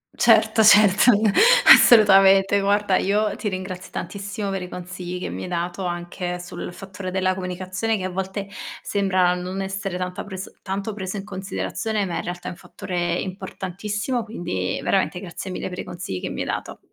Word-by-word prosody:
Certo 220 -1 +4
certo 210 +2 +7 0.6
assolutamente 195 -3 +6
guarda 200 -1 +2
io 210 +2 +1
ti 210 - -3
ringrazio 185 -1 -6
tantissimo 200 0 -5
per 195 -1 -3
i 180 - -7
consigli 180 0 -6
che - - -4
mi - - -6
hai - - -5
dato, 175 +2 -3
anche 175 0 -4
sul 175 0 -7
fattore 190 0 -8
della 185 0 0
comunicazione, 185 +4 -3
che 190 - -5
a 185 - -2
volte 190 +2 -4 0.4
sembra 185 -3 +2
non 180 +2 -5
essere 195 -1 -4
tanta 180 0 -4
preso 190 -2 -8
tanto 200 +2 -4
preso 190 0 -5
in 195 - -5
considerazione 205 +2 -3
ma 175 -3 -3
in - - -3
realtà 175 0 -6
è - - -3
un 175 - -10
fattore 175 -2 -3
importantissimo, 200 +5 -4
quindi 95 - -3
veramente 190 -2 +1
grazie 185 +1 -7
mille 185 - -4
per 180 0 -7
i - - -3
consigli 170 - -6
che - - -4
mi - - -4
hai - - -2
dato. - - -4
190 Hz, 175 wpm, -23 LUFS, 180-200 Hz, 0.6 s, certo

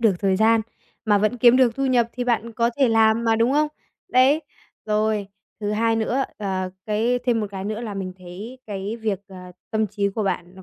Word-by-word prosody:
được 220 -4 +4
thời 190 -2 +2
gian 225 +1 +4 0.4
mà 210 -2 +4
vẫn 215 +4 +1
kiếm 240 0 +6
được 250 -3 +4
thu 275 0 0
nhập, 240 -3 +3
thì 250 -1 -3
bạn 235 -1 0
có 235 +1 +1
thể 270 -3 +4
làm 225 0 +3
mà 225 -1 +3
đúng 230 +3 +2
không? 300 +1 +2 0.4
Đấy, 270 +5 +4 0.4
rồi, 215 -1 0 0.3
thứ 205 - -2
hai 225 +1 +1
nữa, 250 +4 0
ờ, 190 -3 -2 0.2
cái 225 +4 +1
thêm 235 -2 +2
một 210 - -2
cái 190 -1 -6
nữa 215 +2 -3
là 220 -4 -5
mình 190 -2 -4
thấy 195 +8 -9
cái 205 +2 -4
việc, 215 -4 -2
ờ, 190 - -12 0.3
tâm 220 -1 +1
trí 200 0 -1
của 210 +2 -3
bạn 180 -2 -3
nó, 190 - -13
220 Hz, 220 wpm, -23 LUFS, 200-235 Hz, 0.4 s, kiếm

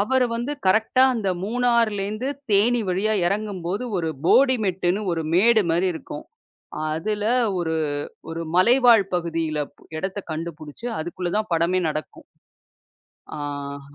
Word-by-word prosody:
அவரு 255 +4 +2
வந்து 240 +5 -2
கரெக்ட்டா 220 +6 +3
அந்த 215 -5 -1
மூணார்லேந்து 230 -1 0 0.2
தேனி 230 +4 +4
வழியா 195 +4 +1
எறங்கும்போது 200 +1 -2
ஒரு 165 -3 -1 0.2
போடி 260 +7 +5
மெட்டுன்னு 185 0 0
ஒரு 165 - -2
மேடு 220 +4 +5
மாரி 175 +3 +2
இருக்கும். - - -8 0.7
அதுல, 205 +6 -2 0.3
ஒரு 160 -2 -1 0.6
ஒரு 165 +1 -4
மலைவாழ் 235 +2 +6
பகுதியில 165 -3 -1 0.2
பு - - -26 0.2
இடத்தை 190 +4 -3
கண்டுபுடிச்சு, 160 +5 -6
அதுக்குள்ள 175 +2 -4
தான் 215 -1 -2
படமே 170 +3 +2
நடக்கும். 155 0 -6 1.1
ஆஹ்ஹ. 140 -1 -6
190 Hz, 120 wpm, -23 LUFS, 165-220 Hz, 1.1 s, மலைவாழ்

